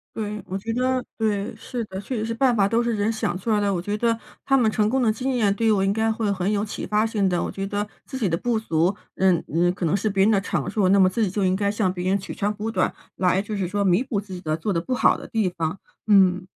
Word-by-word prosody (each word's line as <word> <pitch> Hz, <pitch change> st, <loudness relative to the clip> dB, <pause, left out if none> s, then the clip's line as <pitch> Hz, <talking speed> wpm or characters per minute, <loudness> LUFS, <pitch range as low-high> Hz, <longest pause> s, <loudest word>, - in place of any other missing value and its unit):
对， 210 Hz, -2 st, -4 dB
我 190 Hz, +1 st, -4 dB
觉 225 Hz, +3 st, -4 dB
得 255 Hz, +1 st, +1 dB, 0.2 s
对， 210 Hz, -2 st, -1 dB
是 235 Hz, +1 st, -5 dB
的， 190 Hz, -1 st, -7 dB
确 245 Hz, +4 st, -4 dB
实 215 Hz, -, -2 dB
是 230 Hz, -, -2 dB
办 250 Hz, +1 st, +3 dB
法 200 Hz, -4 st, +3 dB
都 230 Hz, +3 st, +1 dB
是 235 Hz, -1 st, 0 dB
人 205 Hz, +1 st, 0 dB
想 180 Hz, -5 st, -2 dB
出 225 Hz, -, -5 dB
来 210 Hz, -1 st, +3 dB
的。 200 Hz, -1 st, +1 dB
我 175 Hz, -, -1 dB
觉 205 Hz, +3 st, -2 dB
得， 230 Hz, 0 st, +1 dB, 0.3 s
他 270 Hz, 0 st, +4 dB
们 225 Hz, -4 st, +3 dB
成 210 Hz, 0 st, +1 dB
功 265 Hz, +3 st, +1 dB
的 230 Hz, -, +3 dB
经 255 Hz, +5 st, -1 dB
验 215 Hz, -5 st, +2 dB
对 225 Hz, -, -1 dB
于 220 Hz, -, +5 dB
我 195 Hz, -2 st, +2 dB
应 195 Hz, -, +2 dB
该 220 Hz, +1 st, +1 dB
会 220 Hz, -2 st, -1 dB
很 190 Hz, 0 st, 0 dB
有 205 Hz, 0 st, 0 dB
启 205 Hz, -, -5 dB
发 210 Hz, +1 st, +2 dB
性 205 Hz, -4 st, +1 dB
的， 175 Hz, -1 st, 0 dB
我 -, -, -2 dB
觉 195 Hz, -, -4 dB
得 205 Hz, +1 st, -2 dB, 0.2 s
自 265 Hz, -, -6 dB
己 215 Hz, -, +1 dB
的 165 Hz, -, +1 dB
不 230 Hz, +4 st, 0 dB
足， 170 Hz, -2 st, +1 dB, 0.2 s
嗯 185 Hz, -3 st, +3 dB
嗯， 175 Hz, +2 st, +3 dB
可 180 Hz, -, -3 dB
能 160 Hz, -, +2 dB
是 215 Hz, +1 st, 0 dB
别 195 Hz, -1 st, +1 dB
人 215 Hz, -, +4 dB
的 200 Hz, -, +4 dB
长 -, -, -2 dB
处， 200 Hz, -4 st, +1 dB
那 195 Hz, +1 st, +5 dB
么 185 Hz, -1 st, +6 dB
自 220 Hz, +4 st, 0 dB
己 185 Hz, -, 0 dB
就 195 Hz, -1 st, 0 dB
应 185 Hz, 0 st, +2 dB
该 200 Hz, 0 st, 0 dB
向 205 Hz, -3 st, 0 dB
别 180 Hz, 0 st, -2 dB
人 195 Hz, +1 st, +2 dB
取 -, -, -7 dB
长 205 Hz, +1 st, -1 dB
补 215 Hz, +2 st, -4 dB
短， -, -, 0 dB, 0.2 s
来 185 Hz, +1 st, +2 dB
就 210 Hz, +1 st, -5 dB
是 185 Hz, -3 st, -2 dB
说 200 Hz, 0 st, 0 dB
弥 185 Hz, +6 st, +3 dB
补 245 Hz, -6 st, -2 dB
自 195 Hz, -2 st, -9 dB
己 180 Hz, -, -6 dB
的 155 Hz, -3 st, -1 dB
做 195 Hz, +4 st, -2 dB
得 165 Hz, -, 0 dB
不 255 Hz, -, -3 dB
好 -, -, +3 dB
的 -, -, -10 dB
地 220 Hz, -4 st, +1 dB
方。 170 Hz, +1 st, -3 dB, 0.3 s
嗯。 185 Hz, -3 st, +4 dB
205 Hz, 325 characters per minute, -23 LUFS, 190-225 Hz, 0.3 s, 么